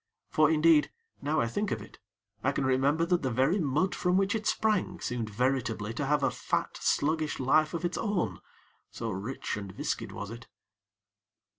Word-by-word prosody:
For, 155 Hz, -1 st, +4 dB
indeed, 160 Hz, -1 st, +5 dB, 0.3 s
now 150 Hz, +2 st, 0 dB
I -, -, +2 dB
think 205 Hz, -, -1 dB
of 115 Hz, -, -2 dB
it, 105 Hz, -, -13 dB, 0.4 s
I 135 Hz, -, +3 dB
can 140 Hz, -, -1 dB
remember 140 Hz, +5 st, +2 dB
that 180 Hz, 0 st, +1 dB
the 130 Hz, -, 0 dB
very 135 Hz, -, +2 dB
mud 155 Hz, +4 st, +1 dB
from 180 Hz, 0 st, +1 dB
which 195 Hz, +1 st, +2 dB
it 220 Hz, -1 st, -2 dB
sprang 210 Hz, -5 st, +1 dB
seemed 120 Hz, -3 st, -3 dB
veritably 115 Hz, -2 st, -1 dB
to 135 Hz, +4 st, -2 dB
have 145 Hz, 0 st, +2 dB
a 135 Hz, -, +3 dB
fat, -, -, -2 dB
sluggish 155 Hz, +1 st, +1 dB
life 155 Hz, +5 st, +3 dB
of 170 Hz, -, -2 dB
its 175 Hz, -, -2 dB
own, 180 Hz, -, -1 dB, 0.5 s
so 115 Hz, -1 st, -4 dB
rich 105 Hz, +7 st, -4 dB
and 100 Hz, -2 st, -6 dB
viscid -, -, -3 dB
was 105 Hz, +1 st, -6 dB
it. 115 Hz, 0 st, -9 dB
145 Hz, 180 wpm, -29 LUFS, 120-170 Hz, 0.5 s, indeed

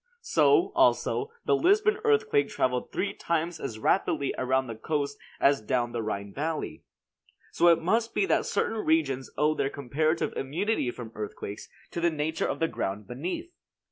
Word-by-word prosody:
So, 420 Hz, -4 st, +4 dB
also, 425 Hz, -, +2 dB, 0.2 s
the -, -, +4 dB
Lisbon 415 Hz, +3 st, +3 dB
earthquake 440 Hz, -1 st, +3 dB
traveled 125 Hz, -1 st, -1 dB
three 200 Hz, -, -1 dB
times 170 Hz, 0 st, -2 dB
as 115 Hz, -5 st, -5 dB
rapidly 140 Hz, -, +1 dB
around 130 Hz, +1 st, +1 dB
the 115 Hz, -, -5 dB
coast 140 Hz, +5 st, -2 dB, 0.2 s
as 140 Hz, -2 st, +4 dB
down 120 Hz, +2 st, 0 dB
the 120 Hz, -1 st, -2 dB
Rhine 100 Hz, -2 st, -4 dB
valley. 155 Hz, +2 st, -3 dB, 0.7 s
So 175 Hz, -, +3 dB
it 170 Hz, -1 st, +6 dB
must 225 Hz, +6 st, +1 dB
be -, -, +3 dB
that -, -, +1 dB
certain 225 Hz, -, 0 dB
regions 140 Hz, -5 st, +1 dB
owe 150 Hz, +1 st, +3 dB
their 135 Hz, -, 0 dB
comparative 155 Hz, +5 st, -1 dB
immunity 165 Hz, -, -1 dB
from 120 Hz, -2 st, -7 dB
earthquakes 105 Hz, -1 st, -6 dB, 0.2 s
to 170 Hz, -, -3 dB
the 170 Hz, -, +4 dB
nature 160 Hz, 0 st, -1 dB
of -, -, -2 dB
the 165 Hz, -, +1 dB
ground 100 Hz, -7 st, -3 dB
beneath. 180 Hz, -, -5 dB
155 Hz, 165 wpm, -28 LUFS, 130-205 Hz, 0.7 s, it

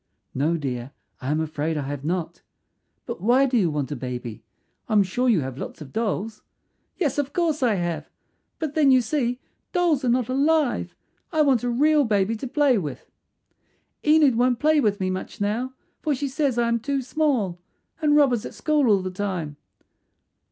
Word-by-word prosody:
"No, 155 Hz, +5 st, +1 dB
dear; 130 Hz, -3 st, -4 dB, 0.3 s
I 130 Hz, -, -4 dB
am 155 Hz, +1 st, +1 dB
afraid 155 Hz, 0 st, -2 dB
I 145 Hz, -, -2 dB
have 140 Hz, 0 st, -5 dB
not. 170 Hz, +1 st, -3 dB, 0.6 s
But -, -, -6 dB
why 245 Hz, +6 st, +4 dB
do 260 Hz, -2 st, -1 dB
you 195 Hz, -8 st, +3 dB
want 145 Hz, -3 st, -3 dB
a -, -, -2 dB
baby? 125 Hz, -3 st, -6 dB, 0.5 s
I -, -, -1 dB
am 205 Hz, -2 st, +6 dB
sure 245 Hz, +7 st, 0 dB
you 205 Hz, -9 st, +3 dB
have 130 Hz, 0 st, -6 dB
lots -, -, -7 dB
of 145 Hz, -4 st, -11 dB
dolls." 220 Hz, -1 st, -2 dB, 0.6 s
"Yes, 295 Hz, -, 0 dB
of 285 Hz, -1 st, -2 dB
course 325 Hz, -4 st, 0 dB
I 235 Hz, -5 st, +3 dB
have; 175 Hz, -3 st, -3 dB, 0.5 s
but 310 Hz, -3 st, -3 dB
then 295 Hz, -3 st, +4 dB
you 260 Hz, -1 st, +6 dB
see 245 Hz, 0 st, -1 dB, 0.3 s
dolls 340 Hz, -7 st, +2 dB
are 250 Hz, -, +1 dB
not 245 Hz, -1 st, +2 dB
alive. 285 Hz, +1 st, +1 dB, 0.4 s
I 315 Hz, -3 st, +3 dB
want 265 Hz, -6 st, +3 dB
a 245 Hz, -, -1 dB
real 295 Hz, +5 st, +3 dB
baby 210 Hz, -2 st, +1 dB
to 265 Hz, -, -5 dB
play 270 Hz, -3 st, +3 dB
with. 150 Hz, -6 st, -7 dB, 0.9 s
"Enid 300 Hz, -5 st, +5 dB
won't 245 Hz, 0 st, +3 dB
play 305 Hz, +3 st, +3 dB
with 210 Hz, -6 st, +1 dB
me 185 Hz, -1 st, 0 dB
much 185 Hz, -, -6 dB
now, 225 Hz, +6 st, -1 dB, 0.3 s
for 300 Hz, -3 st, 0 dB
she 280 Hz, +2 st, -2 dB
says 275 Hz, -2 st, 0 dB
I 235 Hz, -1 st, +2 dB
am 235 Hz, 0 st, +1 dB
too 275 Hz, +2 st, -2 dB
small, 245 Hz, -, 0 dB, 0.4 s
and 295 Hz, -1 st, +3 dB
Rob 285 Hz, -4 st, +5 dB
is 230 Hz, -, -1 dB
at -, -, -8 dB
school 300 Hz, -4 st, +1 dB
all 200 Hz, -3 st, +3 dB
the 185 Hz, -, -3 dB
time." 180 Hz, -6 st, -3 dB
235 Hz, 195 wpm, -24 LUFS, 175-280 Hz, 0.9 s, am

